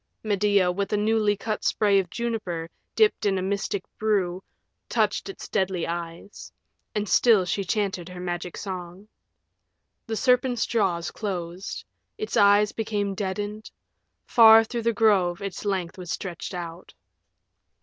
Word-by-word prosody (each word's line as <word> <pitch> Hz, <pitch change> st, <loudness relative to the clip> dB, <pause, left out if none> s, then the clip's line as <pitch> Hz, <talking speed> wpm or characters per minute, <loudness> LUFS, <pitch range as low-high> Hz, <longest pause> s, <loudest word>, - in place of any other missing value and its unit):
Medea, 200 Hz, -3 st, +2 dB
with 195 Hz, +2 st, -3 dB
a -, -, +3 dB
newly 210 Hz, -1 st, +2 dB
cut 215 Hz, +1 st, -3 dB
spray 205 Hz, -2 st, +3 dB
of 185 Hz, -2 st, -3 dB
juniper 190 Hz, -5 st, -3 dB, 0.3 s
dipped 435 Hz, -1 st, +3 dB
in 195 Hz, -1 st, +1 dB
a -, -, -1 dB
mystic 200 Hz, 0 st, -2 dB, 0.2 s
brew, 190 Hz, -4 st, 0 dB, 0.5 s
touched -, -, 0 dB
its 390 Hz, -, -8 dB
deadly 190 Hz, -4 st, -1 dB
eyes. 170 Hz, +3 st, -7 dB, 0.4 s
And 210 Hz, 0 st, -1 dB
still 215 Hz, -5 st, +4 dB
she 185 Hz, +3 st, -1 dB
chanted 190 Hz, -3 st, -2 dB
her 180 Hz, 0 st, -9 dB
Magic 175 Hz, -1 st, -4 dB
Song. 185 Hz, 0 st, -7 dB, 1.0 s
The 225 Hz, -, -2 dB
serpent's 250 Hz, 0 st, +2 dB
jaws 190 Hz, -7 st, 0 dB
closed; 185 Hz, -2 st, -5 dB, 0.3 s
its 430 Hz, 0 st, -4 dB
eyes 205 Hz, +1 st, +5 dB
became 205 Hz, -3 st, -2 dB
deadened; 205 Hz, +2 st, -4 dB, 0.6 s
far 225 Hz, -1 st, +8 dB
through 235 Hz, +1 st, -4 dB
the 230 Hz, +1 st, +2 dB
grove 195 Hz, -5 st, +3 dB
its 200 Hz, 0 st, -6 dB
length 190 Hz, -3 st, -2 dB
was 180 Hz, -2 st, -8 dB
stretched 180 Hz, +1 st, -5 dB
out. 170 Hz, 0 st, -8 dB
200 Hz, 140 wpm, -25 LUFS, 180-215 Hz, 1.0 s, far